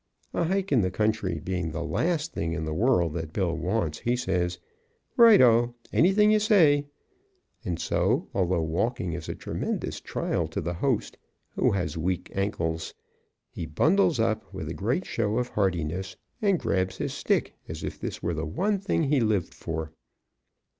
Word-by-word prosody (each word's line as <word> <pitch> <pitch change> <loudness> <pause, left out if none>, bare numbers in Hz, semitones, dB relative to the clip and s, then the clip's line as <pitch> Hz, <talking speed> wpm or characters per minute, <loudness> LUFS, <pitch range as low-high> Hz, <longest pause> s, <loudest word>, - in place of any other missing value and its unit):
A 170 - +1
hike 190 +1 -1
in 130 -5 +4
the 95 - +1
country 105 -4 0
being 90 0 -2
the 85 +2 -4
last 160 - -1
thing 80 0 -2
in 80 -2 -3
the 80 - -3
world 90 -5 +2
that 80 -2 -4
Bill 85 -2 0
wants, 85 -2 -1
he 120 +1 0
says, 90 -6 -1 0.6
"Right 230 -3 +8
o! 120 -1 +5 0.2
Anything 205 +5 +5
you 215 - +4
say." 160 -10 +4 0.8
And 85 -3 -3
so, - - +1
although 90 -3 +1
walking 90 +4 -1
is 85 -2 -6
a - - -3
tremendous - - -3
trial - - -2
to - - -4
the 85 +2 -2
host, 120 +6 -1 0.4
who - - +2
has 90 -3 -2
weak 90 +2 -2
ankles, 85 -5 -2 0.6
he 85 - -5
bundles 160 - +3
up 110 -1 0
with 80 -1 -6
a - - -3
great 115 - -1
show 110 -1 -1
of 125 0 -1
heartiness 95 -1 -1 0.3
and 200 -4 +3
grabs 95 - -1
his - - -3
stick - - 0
as - - -6
if - - -5
this - - -5
were 85 - 0
the 80 0 -3
one 195 - 0
thing 185 -4 0
he 145 -1 +2
lived 105 -6 0
for. 80 -1 -5
100 Hz, 175 wpm, -27 LUFS, 85-140 Hz, 0.8 s, Right